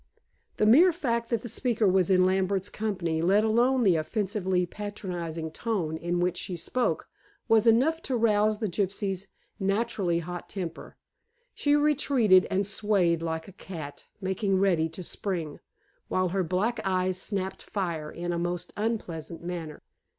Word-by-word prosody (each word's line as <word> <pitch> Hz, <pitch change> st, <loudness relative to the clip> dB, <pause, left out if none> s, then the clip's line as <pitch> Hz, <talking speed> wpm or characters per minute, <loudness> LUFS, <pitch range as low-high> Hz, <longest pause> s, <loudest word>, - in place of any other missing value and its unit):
The 215 Hz, -, +3 dB
mere 310 Hz, +12 st, +7 dB
fact 235 Hz, -9 st, -2 dB
that 235 Hz, -2 st, -1 dB
the -, -, -5 dB
speaker 230 Hz, -2 st, +1 dB
was 185 Hz, -1 st, +3 dB
in 185 Hz, -1 st, +5 dB
Lambert's 190 Hz, +1 st, +1 dB
company, 180 Hz, -7 st, -2 dB
let 195 Hz, +5 st, +4 dB
alone 240 Hz, +4 st, +3 dB
the 185 Hz, -6 st, +4 dB
offensively 190 Hz, +1 st, 0 dB
patronizing 175 Hz, -5 st, -5 dB
tone 180 Hz, -5 st, -2 dB
in 175 Hz, +2 st, -2 dB
which 175 Hz, 0 st, 0 dB
she 180 Hz, -, -4 dB
spoke, 250 Hz, +9 st, -1 dB, 0.4 s
was 225 Hz, 0 st, +4 dB
enough 275 Hz, +9 st, +4 dB
to 260 Hz, -, +1 dB
rouse 215 Hz, -1 st, +3 dB
the 215 Hz, -, -2 dB
gypsy 195 Hz, +2 st, -1 dB
girl's 190 Hz, 0 st, -5 dB, 0.3 s
naturally 195 Hz, -3 st, 0 dB
hot 175 Hz, +1 st, -6 dB
temper. 180 Hz, -4 st, -6 dB, 0.6 s
She 290 Hz, 0 st, +2 dB
retreated 275 Hz, -10 st, +4 dB
and 195 Hz, +1 st, +1 dB
swayed 195 Hz, -5 st, +2 dB
like 160 Hz, -1 st, -3 dB
a -, -, -10 dB
cat 160 Hz, -7 st, -8 dB
making 190 Hz, 0 st, 0 dB
ready 175 Hz, -4 st, +2 dB
to 170 Hz, +3 st, -8 dB
spring, 170 Hz, -5 st, -4 dB, 0.5 s
while 185 Hz, -1 st, +1 dB
her 190 Hz, +1 st, 0 dB
black 190 Hz, +8 st, 0 dB
eyes 185 Hz, -1 st, 0 dB
snapped 190 Hz, -2 st, -3 dB
fire 170 Hz, -6 st, -3 dB
in 175 Hz, +2 st, -4 dB
a 170 Hz, -, -1 dB
most 175 Hz, 0 st, -3 dB
unpleasant 170 Hz, -7 st, -3 dB
manner. 170 Hz, -3 st, -6 dB
190 Hz, 155 wpm, -27 LUFS, 175-215 Hz, 0.6 s, mere